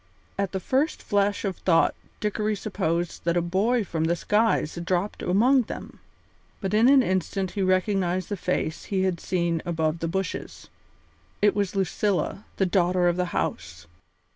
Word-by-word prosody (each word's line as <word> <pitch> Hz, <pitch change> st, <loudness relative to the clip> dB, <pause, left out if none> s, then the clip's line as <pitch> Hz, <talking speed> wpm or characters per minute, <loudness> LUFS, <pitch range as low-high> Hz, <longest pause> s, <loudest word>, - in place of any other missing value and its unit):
At 200 Hz, -2 st, -1 dB
the 190 Hz, -, -2 dB
first 270 Hz, -, 0 dB
flash 205 Hz, +1 st, +1 dB
of 190 Hz, -2 st, -2 dB
thought 165 Hz, -3 st, +3 dB, 0.3 s
Dickory 210 Hz, 0 st, -1 dB
supposed 175 Hz, -4 st, -2 dB
that 170 Hz, +1 st, +1 dB
a -, -, +5 dB
boy 210 Hz, +7 st, +1 dB
from 160 Hz, -4 st, -2 dB
the 170 Hz, +1 st, +2 dB
skies 210 Hz, -3 st, +1 dB
had 170 Hz, -, -5 dB
dropped 185 Hz, +3 st, -1 dB
among 245 Hz, +9 st, +4 dB
them, -, -, -8 dB, 0.6 s
but 195 Hz, -1 st, -3 dB
in 225 Hz, +4 st, +5 dB
an 275 Hz, -2 st, +6 dB
instant 185 Hz, 0 st, -1 dB
he 205 Hz, -, -3 dB
recognised 185 Hz, -1 st, +1 dB
the 205 Hz, -, -1 dB
face 175 Hz, -3 st, -2 dB
he 190 Hz, -2 st, 0 dB
had 185 Hz, -3 st, 0 dB
seen 170 Hz, -3 st, -1 dB
above 160 Hz, -2 st, -1 dB
the 165 Hz, -, -2 dB
bushes. 190 Hz, 0 st, -4 dB, 0.7 s
It 205 Hz, 0 st, +4 dB
was 200 Hz, -2 st, -1 dB
Lucilla, 195 Hz, +1 st, -1 dB
the 190 Hz, -, +2 dB
daughter 180 Hz, -1 st, +2 dB
of 175 Hz, -, +2 dB
the 180 Hz, 0 st, 0 dB
house! 85 Hz, -, -4 dB
185 Hz, 165 wpm, -25 LUFS, 175-205 Hz, 0.7 s, an